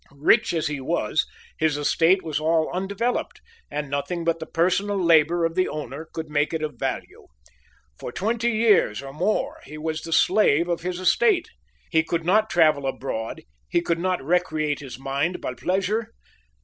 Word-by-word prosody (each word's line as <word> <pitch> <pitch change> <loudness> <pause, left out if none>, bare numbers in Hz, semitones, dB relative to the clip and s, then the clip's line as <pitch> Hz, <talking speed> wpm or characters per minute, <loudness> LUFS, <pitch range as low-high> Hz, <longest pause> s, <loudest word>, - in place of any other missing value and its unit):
Rich 155 +11 +3
as 160 - 0
he 150 -3 -2
was, 155 +2 0 0.3
his 155 -2 +2
estate 165 +5 +3
was 155 -2 -2
all 160 0 +1
undeveloped, 200 +6 -2 0.3
and 150 -1 -3
nothing 140 +5 -3
but 165 0 0
the 160 - -6
personal 190 +5 +1
labor 170 -1 +4
of 165 - -1
the 185 +1 +1
owner 150 +1 -6
could 160 -1 -5
make 150 +2 0
it 160 - -3
of 150 -1 -5
value. 135 -1 -4 0.7
For - - -6
twenty 230 - 0
years 210 - +3
or 135 0 -8
more 185 +8 -1
he 150 +3 -10
was 155 +1 -3
the 165 - -8
slave 170 -3 +4
of 170 -1 -1
his 180 +1 -3
estate. 385 - +2 0.4
He 160 -2 +4
could 165 0 -3
not 215 +5 +3
travel 155 -5 +3
abroad; 115 -4 -4 0.3
he 170 - +2
could 170 -1 -1
not 180 -5 -1
recreate 155 -3 0
his 130 -4 -8
mind 140 +6 -2
by 125 - -4
pleasure. 195 - -1
165 Hz, 175 wpm, -24 LUFS, 150-185 Hz, 0.7 s, labor